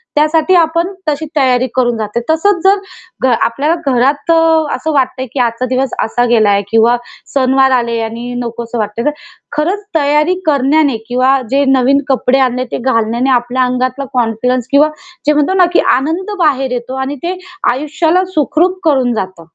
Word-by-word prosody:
त्यासाठी 310 Hz, +4 st, +2 dB
आपण 335 Hz, 0 st, +2 dB, 0.2 s
तशी 300 Hz, +2 st, -2 dB
तयारी 255 Hz, -2 st, +2 dB
करून 240 Hz, -2 st, +1 dB
जाते. 215 Hz, +1 st, -3 dB
तसच 325 Hz, +6 st, +2 dB
जर 390 Hz, +1 st, +4 dB, 0.5 s
घ 260 Hz, -, +4 dB, 0.2 s
आपल्या 280 Hz, +8 st, 0 dB
घरात 275 Hz, +5 st, +1 dB
अ, -, -, +5 dB, 0.4 s
असं 315 Hz, -, -3 dB
वाटतंय 260 Hz, -2 st, 0 dB
की 270 Hz, -, -3 dB
आजचा 235 Hz, +1 st, 0 dB
दिवस 255 Hz, 0 st, -1 dB
असा 245 Hz, +2 st, 0 dB
गेला 210 Hz, -4 st, +3 dB
किंवा 225 Hz, +2 st, +4 dB, 0.4 s
सणवार 265 Hz, 0 st, +3 dB
आले 235 Hz, -2 st, 0 dB
आणि 230 Hz, +2 st, -5 dB
नको 235 Hz, 0 st, -5 dB
असं 235 Hz, +1 st, -6 dB
वाटतंय 210 Hz, +2 st, -3 dB
तर 295 Hz, -, +2 dB, 0.5 s
खरंच 365 Hz, +7 st, -1 dB
तयारी 300 Hz, +3 st, +2 dB
करण्याने 285 Hz, -2 st, +2 dB
किंवा 255 Hz, +2 st, +2 dB
जे 280 Hz, +1 st, +2 dB
नवीन 270 Hz, +1 st, +3 dB
कपडे 265 Hz, 0 st, +2 dB
आणले 255 Hz, -1 st, +1 dB
ते -, -, -2 dB
घालण्याने 235 Hz, 0 st, 0 dB
आपल्या 245 Hz, +1 st, +1 dB
अंगातला 255 Hz, +2 st, -1 dB
कॉन्फिडन्स 245 Hz, +1 st, 0 dB
किंवा 290 Hz, +2 st, +4 dB, 0.4 s
जे 300 Hz, -, +5 dB
म्हणतो 300 Hz, +5 st, +1 dB
ना 370 Hz, -1 st, +5 dB
की -, -, +4 dB
आनंद 325 Hz, +10 st, -1 dB
बाहेर 270 Hz, -5 st, +1 dB
येतो 250 Hz, +1 st, -4 dB
आणि 265 Hz, +2 st, -3 dB
ते 360 Hz, +2 st, -2 dB, 0.3 s
आयुष्याला 315 Hz, +7 st, 0 dB
सुखरूप 335 Hz, +5 st, +1 dB
करून 265 Hz, -6 st, +2 dB
जातं. 185 Hz, -5 st, -5 dB
260 Hz, 165 wpm, -13 LUFS, 245-300 Hz, 0.5 s, अ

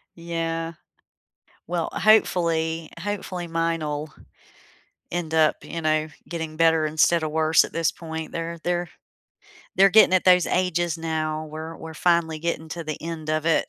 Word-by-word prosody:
Yeah. 165 Hz, -1 st, -3 dB, 1.0 s
Well, 170 Hz, -1 st, -2 dB
hopefully, 165 Hz, -6 st, +2 dB
hopefully 185 Hz, -2 st, -4 dB
mine'll 160 Hz, -3 st, -2 dB, 1.0 s
end 170 Hz, -2 st, -3 dB
up, 160 Hz, -1 st, +4 dB
you 165 Hz, -, -6 dB
know, 155 Hz, 0 st, +1 dB, 0.2 s
getting 160 Hz, -2 st, -5 dB
better 165 Hz, -1 st, +4 dB
instead 160 Hz, +2 st, +2 dB
of 155 Hz, -, -2 dB
worse 160 Hz, 0 st, +4 dB
at -, -, -7 dB
this 165 Hz, -1 st, +1 dB
point. 160 Hz, -1 st, -7 dB
They're 170 Hz, 0 st, -4 dB
they're 175 Hz, -1 st, -1 dB, 0.9 s
they're 195 Hz, +2 st, +7 dB
getting 210 Hz, -2 st, +6 dB
at 185 Hz, -, +3 dB
those 180 Hz, -1 st, +5 dB
ages 175 Hz, -2 st, 0 dB
now. 155 Hz, -1 st, -2 dB
We're 160 Hz, +1 st, -7 dB
we're 160 Hz, 0 st, -9 dB
finally 170 Hz, -1 st, +1 dB
getting 160 Hz, 0 st, -3 dB
to 170 Hz, +1 st, -5 dB
the 155 Hz, -1 st, -4 dB
end 160 Hz, -1 st, -6 dB
of 155 Hz, 0 st, -1 dB
it. 165 Hz, -, +2 dB
165 Hz, 150 wpm, -24 LUFS, 155-170 Hz, 1.0 s, they're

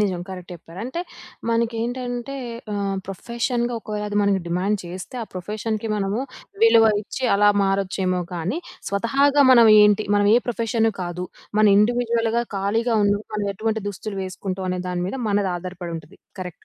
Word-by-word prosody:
నిజం 190 Hz, -4 st, 0 dB
కరెక్ట్ 180 Hz, -1 st, -8 dB
చెప్పారు. 170 Hz, +1 st, -13 dB
అంటే 260 Hz, +7 st, -4 dB, 0.5 s
మనకేంటంటే, 240 Hz, +3 st, -2 dB, 0.4 s
ఆహ్, 200 Hz, -1 st, -1 dB
ప్రొఫెషన్‌గా 235 Hz, +4 st, -2 dB
ఒకవేళ 210 Hz, -1 st, -4 dB
అది 205 Hz, -, -2 dB
మనకి 200 Hz, -1 st, +2 dB
డిమాండ్ 190 Hz, +4 st, 0 dB
చేస్తే, 185 Hz, +7 st, -8 dB
ఆ -, -, -4 dB
ప్రొఫెషన్‌కి 215 Hz, +4 st, -3 dB
మనము 200 Hz, +4 st, -1 dB, 0.4 s
విలువ 230 Hz, -, +7 dB, 0.2 s
ఇచ్చి 255 Hz, +5 st, -5 dB
అలా 205 Hz, +1 st, +5 dB
మారొచ్చేమో 190 Hz, -2 st, 0 dB
కానీ, 180 Hz, -, -2 dB, 0.3 s
స్వతహాగా 275 Hz, +8 st, +3 dB
మనమేంటి, 215 Hz, -3 st, +7 dB
మనం 205 Hz, -, +3 dB
ఏ -, -, +7 dB
ప్రొఫెషన్ 230 Hz, -1 st, +1 dB
కాదు. 180 Hz, +1 st, -4 dB, 0.3 s
మనం 215 Hz, -1 st, +6 dB
ఇండివిజువల్‌గా 235 Hz, +1 st, +2 dB
ఖాళీగా 225 Hz, +4 st, +1 dB
ఉన్నా, 200 Hz, 0 st, +2 dB
మనం 205 Hz, -1 st, -1 dB
ఎటువంటి 220 Hz, +1 st, -2 dB
దుస్తులు 200 Hz, 0 st, -6 dB
వేసుకుంటాం 185 Hz, 0 st, -4 dB
అనే 180 Hz, 0 st, -2 dB
దాని 180 Hz, -1 st, -2 dB
మీద -, -, -4 dB
మనది 200 Hz, -2 st, +1 dB
ఆధారపడి 175 Hz, -1 st, -6 dB
ఉంటుంది. 160 Hz, +4 st, -12 dB, 0.2 s
కరెక్ట్. 180 Hz, -2 st, -8 dB
205 Hz, 150 wpm, -23 LUFS, 190-230 Hz, 0.5 s, విలువ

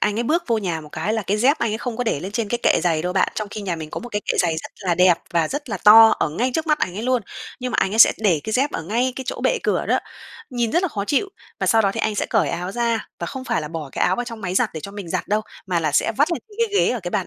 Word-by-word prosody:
anh 210 Hz, +1 st, +1 dB
ấy -, -, +1 dB
bước 320 Hz, +8 st, +1 dB
vô 230 Hz, -2 st, +1 dB
nhà 175 Hz, -6 st, -2 dB
một 150 Hz, -, -12 dB
cái 180 Hz, +7 st, -2 dB
là 225 Hz, -, -1 dB
cái 200 Hz, +1 st, 0 dB
dép 265 Hz, +8 st, +3 dB
anh 230 Hz, -, 0 dB
ấy 220 Hz, -, -2 dB
không 240 Hz, -3 st, -4 dB
có 245 Hz, -, -2 dB
để 145 Hz, -10 st, -1 dB
lên 195 Hz, +3 st, -6 dB
trên 220 Hz, -1 st, -2 dB
cái 240 Hz, -, -1 dB
kệ -, -, +3 dB
giày 165 Hz, -3 st, +1 dB
đâu 180 Hz, 0 st, -2 dB
bạn, 190 Hz, -, +2 dB
trong 215 Hz, -1 st, -3 dB
khi 210 Hz, -, -6 dB
nhà 180 Hz, -4 st, -3 dB
mình 155 Hz, -1 st, -7 dB
có -, -, -5 dB
một 245 Hz, -, -8 dB
cái 205 Hz, -2 st, -2 dB
kệ -, -, 0 dB
giày 165 Hz, -3 st, 0 dB
rất -, -, -6 dB, 0.2 s
là 175 Hz, -, +3 dB
đẹp 180 Hz, -1 st, +4 dB
và 165 Hz, -2 st, +2 dB
rất 290 Hz, -1 st, -5 dB
là -, -, -2 dB
to 225 Hz, +2 st, +10 dB
ở -, -, +1 dB
ngay 235 Hz, +12 st, -1 dB
trước 320 Hz, 0 st, -1 dB
mắt 305 Hz, -1 st, +2 dB
ảnh 180 Hz, -, -2 dB
ấy 215 Hz, -, -4 dB
luôn, 255 Hz, -1 st, +1 dB, 0.4 s
nhưng 250 Hz, 0 st, -3 dB
mà -, -, 0 dB
ảnh 195 Hz, -, +1 dB
ấy 220 Hz, -, -2 dB
sẽ -, -, +9 dB
để 185 Hz, -9 st, +2 dB
cái 220 Hz, -, -4 dB
dép 270 Hz, +5 st, +2 dB
ở 165 Hz, -, -3 dB
ngay 240 Hz, +8 st, 0 dB
cái 265 Hz, -, -5 dB
chỗ -, -, -4 dB
bệ -, -, +2 dB
cửa -, -, 0 dB
đó, -, -, +2 dB, 0.5 s
nhìn 240 Hz, -3 st, -1 dB
rất 345 Hz, -, +2 dB
là 375 Hz, -, +1 dB
khó 200 Hz, -7 st, -4 dB
chịu. 295 Hz, -, 0 dB, 0.3 s
Và -, -, 0 dB
sau 225 Hz, -1 st, +4 dB
đó 195 Hz, -, +2 dB
thì 225 Hz, -, -3 dB
anh 215 Hz, -, 0 dB
sẽ -, -, -1 dB
cởi -, -, +1 dB
áo 180 Hz, +2 st, -4 dB
ra, 235 Hz, -1 st, -1 dB
và -, -, -4 dB
không 265 Hz, -1 st, -6 dB
phải -, -, 0 dB
là 150 Hz, -, -5 dB
bỏ 160 Hz, -3 st, -6 dB
cái -, -, 0 dB
áo -, -, +2 dB
vào 245 Hz, -, -2 dB
trong 230 Hz, -2 st, -8 dB
máy 180 Hz, -1 st, -3 dB
giặt -, -, +2 dB
để 155 Hz, -, -5 dB
cho 200 Hz, -, -8 dB
mình 200 Hz, -3 st, -8 dB
giặt -, -, -3 dB
đâu, 210 Hz, +1 st, +2 dB, 0.3 s
mà 180 Hz, -2 st, 0 dB
là 155 Hz, -3 st, -1 dB
sẽ 225 Hz, -, +2 dB
vắt 305 Hz, +5 st, +2 dB
lên -, -, -2 dB
trên 415 Hz, -, -17 dB
cái 410 Hz, -, 0 dB
ghế -, -, +3 dB
ở 245 Hz, -, -3 dB
cái 175 Hz, -1 st, -5 dB
bàn 195 Hz, -4 st, -1 dB
215 Hz, 350 wpm, -21 LUFS, 180-245 Hz, 0.5 s, to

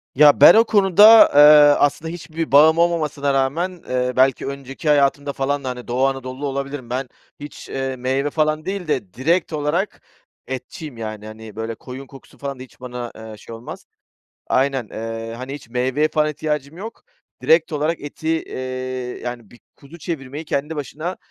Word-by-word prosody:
Ya, 145 Hz, 0 st, +6 dB
ben 160 Hz, -, +10 dB
o 225 Hz, -, +6 dB
konuda, 210 Hz, +1 st, +7 dB
eee, -, -, +7 dB, 0.4 s
aslında 150 Hz, +3 st, +1 dB
hiçbir 165 Hz, -1 st, -6 dB
bağım 155 Hz, +3 st, +6 dB
olmamasına 155 Hz, -5 st, 0 dB
rağmen, 165 Hz, +7 st, -1 dB
eee, 125 Hz, 0 st, -1 dB
belki 130 Hz, 0 st, +2 dB
önceki 140 Hz, +3 st, -5 dB
hayatımda 140 Hz, 0 st, +2 dB
falan 140 Hz, +1 st, -2 dB
da, 130 Hz, -, -3 dB
hani, 125 Hz, -1 st, -7 dB
Doğu 125 Hz, +2 st, +1 dB
Anadolu'lu 135 Hz, +1 st, -4 dB
olabilirim. 140 Hz, -2 st, -5 dB
Ben 125 Hz, +1 st, -3 dB, 0.3 s
hiç, 145 Hz, 0 st, -10 dB
eee, 135 Hz, 0 st, -3 dB
meyve 130 Hz, +3 st, -1 dB
falan 155 Hz, +1 st, 0 dB
değil 190 Hz, -2 st, -4 dB
de 105 Hz, -11 st, -2 dB
direkt 165 Hz, -, 0 dB
olarak 155 Hz, +7 st, -2 dB, 0.5 s
etçiyim. 130 Hz, +2 st, -7 dB
Yani, 110 Hz, -2 st, -6 dB
hani, 110 Hz, -1 st, -11 dB
böyle 110 Hz, +1 st, -4 dB
koyun 130 Hz, +4 st, -10 dB
kokusu 135 Hz, -1 st, -16 dB
falan 140 Hz, -2 st, -6 dB
da -, -, -7 dB
hiç 130 Hz, -, -18 dB
bana, 125 Hz, -1 st, -6 dB
eee, 110 Hz, -1 st, -10 dB
şey 115 Hz, -, -10 dB
olmaz. 115 Hz, +2 st, -10 dB, 0.6 s
Aynen, 135 Hz, -3 st, 0 dB
eee, 115 Hz, 0 st, -6 dB
hani, 130 Hz, +3 st, -7 dB
hiç 145 Hz, -, -11 dB
meyveye 130 Hz, +5 st, 0 dB
falan 155 Hz, 0 st, +1 dB
ihtiyacım 150 Hz, 0 st, -4 dB
yok. 220 Hz, +5 st, -9 dB, 0.4 s
Direkt 160 Hz, 0 st, +3 dB
olarak 155 Hz, +3 st, -1 dB
eti, 145 Hz, +2 st, -7 dB
eee, 160 Hz, -4 st, -2 dB, 0.6 s
yani 120 Hz, -4 st, -7 dB
bir 120 Hz, -, -18 dB, 0.2 s
kuzu 150 Hz, +4 st, -14 dB
çevirmeyi 150 Hz, -3 st, -6 dB
kendi 150 Hz, +1 st, -3 dB
başına, 155 Hz, +5 st, -5 dB
140 Hz, 170 wpm, -20 LUFS, 125-155 Hz, 0.6 s, ben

